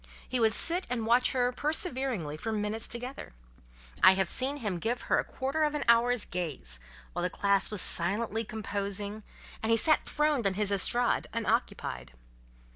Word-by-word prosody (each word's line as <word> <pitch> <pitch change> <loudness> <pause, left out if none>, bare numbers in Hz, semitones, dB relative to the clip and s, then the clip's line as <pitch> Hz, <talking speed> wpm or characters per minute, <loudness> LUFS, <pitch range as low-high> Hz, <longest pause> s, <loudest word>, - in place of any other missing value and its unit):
He 255 - -2
would 225 -1 +3
sit 350 +3 +3
and 240 -3 -2
watch 240 +2 +3
her 250 -1 +1
perseveringly 260 - -1
for 190 +9 -5
minutes 215 +1 -2
together. 245 - -7 0.7
I 190 - +8
have 190 -1 0
seen 270 +3 +3
him 205 -9 -3
give 240 +5 -2
her - - +1
a - - 0
quarter 275 +4 -3
of 300 0 0
an 295 - -2
hour's 235 0 +3
gaze, 145 - -5 0.3
while 175 - -3
the 180 - 0
class 200 0 +1
was 210 -3 +4
silently 215 +5 +1
composing, 205 -1 -4 0.4
and 220 - -2
he 230 - +4
sat 310 +7 +3
throned 300 -7 0
on 190 - -1
his 205 0 0
estrade, 235 +5 +2
unoccupied. 60 0 -2
225 Hz, 170 wpm, -29 LUFS, 195-250 Hz, 0.7 s, I